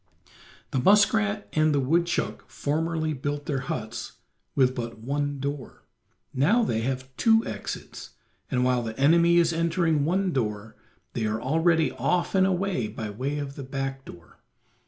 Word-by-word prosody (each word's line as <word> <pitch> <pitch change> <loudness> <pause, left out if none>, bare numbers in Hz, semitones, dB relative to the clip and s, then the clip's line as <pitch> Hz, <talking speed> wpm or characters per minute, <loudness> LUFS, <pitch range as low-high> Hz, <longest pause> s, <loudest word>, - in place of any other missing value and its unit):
The 130 - 0
muskrat 205 - +3
and 155 -1 +3
the - - +3
woodchuck 170 +6 0
formerly 160 +1 -1
built 145 +1 -4
their 140 -4 -1
huts 115 -4 -5 0.4
with 130 -2 +3
but 115 -2 -5
one 145 +4 -2
door; 140 -1 -5 0.5
now 190 - +3
they 115 - 0
have 130 +1 -4
two 225 0 +4
exits, - - -6 0.4
and 125 -2 +1
while 125 -1 +2
the 110 0 -6
enemy 170 +4 +5
is 170 -1 +4
entering 165 -2 +1
one 185 +3 +1
door 105 -3 -3 0.4
they 110 -2 -1
are 110 +1 -1
already 160 +5 +2
off 180 -1 0
and 190 -1 +4
away 185 - 0
by 105 0 -6
way 135 +7 -3
of 140 -1 -5
the - - -7
back 135 0 -4
door. 85 -9 -14
145 Hz, 155 wpm, -26 LUFS, 130-170 Hz, 0.5 s, enemy